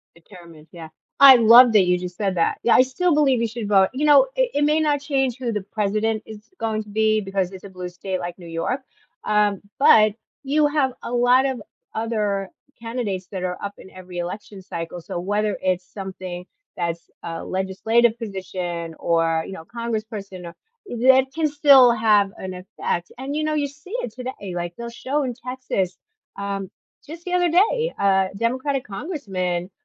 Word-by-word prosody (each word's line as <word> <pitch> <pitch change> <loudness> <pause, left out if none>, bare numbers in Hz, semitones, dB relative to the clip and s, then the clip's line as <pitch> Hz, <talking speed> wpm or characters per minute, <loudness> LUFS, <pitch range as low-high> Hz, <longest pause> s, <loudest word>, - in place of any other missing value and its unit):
Determined, 170 -3 -15
yeah, 165 -2 -9 0.3
I 275 -2 +11
love 235 +1 +8
that 200 -3 +6
you 180 0 +3
just 180 0 -7
said 195 -2 -1
that, 165 - +1
yeah, 235 - +5
I - - +7
still 310 +7 0
believe 280 -4 +3
we 230 - +1
should 225 -1 -5
vote. 195 -2 +4
You 295 +3 0
know, 295 +11 +7
it - - +1
it 290 - +2
may 305 +1 +3
not 295 -2 +1
change 270 -4 0
who 245 -3 -2
the 210 -2 -2
president 215 +1 -1
is 215 -1 -10 0.2
going 220 -1 -2
to 210 - -17
be 215 +1 +2
because 195 -2 -2
it's 190 - -10
a - - -9
blue 180 -1 -7
state 185 +1 -5
like 175 -1 -6
New 175 -2 -12
York, 165 +11 -2 0.4
uh, 210 -1 +3 0.3
but 215 -6 +6 0.3
you 295 +2 +2
have 290 -3 +1
a 240 - -5
lot 245 +2 +4
of 260 -5 -3 0.3
other 210 -3 -1 0.3
candidates 230 -6 -4
that 185 -2 -5
are 180 -1 -2
up 200 0 -5
in - - -13
every 185 -1 -10
election 190 +2 -6
cycle, 170 0 -6
so 175 - -5
whether 205 +2 -1
it's 185 -1 0
something 185 -2 -7 0.3
that's 170 -1 -3
a 165 -1 -6
legislative 220 +5 +1
position 180 -5 -5
or, 165 -1 +1
you - - -8
know, 160 -4 -8
Congressperson 215 -4 -5
or 170 - -9 0.3
that 260 +2 +4
can 320 0 0
still 280 -4 +6
have 215 -3 +3
an 185 -1 -6
effect 180 -2 -4
and, 275 +3 -4
you 310 - -1
know, 310 0 0
you 290 -2 0
see 295 +9 -12
it 220 - -5
today 250 +1 -5
eh, 190 -3 -6
like, 175 0 -4
they'll 235 0 -6
show 265 +5 -2
in 245 -2 -3
Texas, 250 -8 -2 0.4
um, 200 -1 -4 0.4
just 330 +3 -10
the 360 0 -3
other 355 -1 +2
day, 450 +8 +2
uh, 195 -1 +3
Democratic 260 +5 -1
Congressman 195 - -4
215 Hz, 190 wpm, -22 LUFS, 185-260 Hz, 0.4 s, I